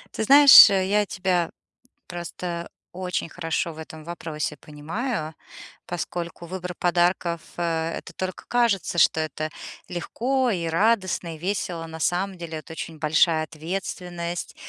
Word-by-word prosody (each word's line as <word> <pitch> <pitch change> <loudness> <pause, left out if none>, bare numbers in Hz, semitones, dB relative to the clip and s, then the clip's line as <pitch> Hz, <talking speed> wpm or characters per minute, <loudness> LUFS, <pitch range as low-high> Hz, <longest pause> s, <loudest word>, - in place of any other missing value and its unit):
Ты - - -1
знаешь, 280 0 +10
я 200 +2 +2
тебя 180 -3 -1 0.6
просто 175 0 -5 0.2
очень 180 -2 -3
хорошо 165 0 -2
в - - -15
этом 160 0 -9
вопросе 155 -3 -5
понимаю, 155 - -4 0.5
поскольку 175 0 -5
выбор 180 0 -5
подарков- 175 -1 +1 0.2
э, 165 -1 -1
это - - -10
только 185 0 -5
кажется, 230 -7 +1
что 160 - +4
это 155 0 -3 0.4
легко 250 +9 -1
и 175 -5 -2
радостно, 185 -1 +1
и - - -11
весело. 175 -2 -3
На 160 0 -8
самом 185 +3 0
деле, 165 -2 -6
это 160 - -11
очень 160 0 -7
большая 155 +1 +3
ответственность, 175 +1 -5
175 Hz, 130 wpm, -24 LUFS, 160-190 Hz, 0.6 s, знаешь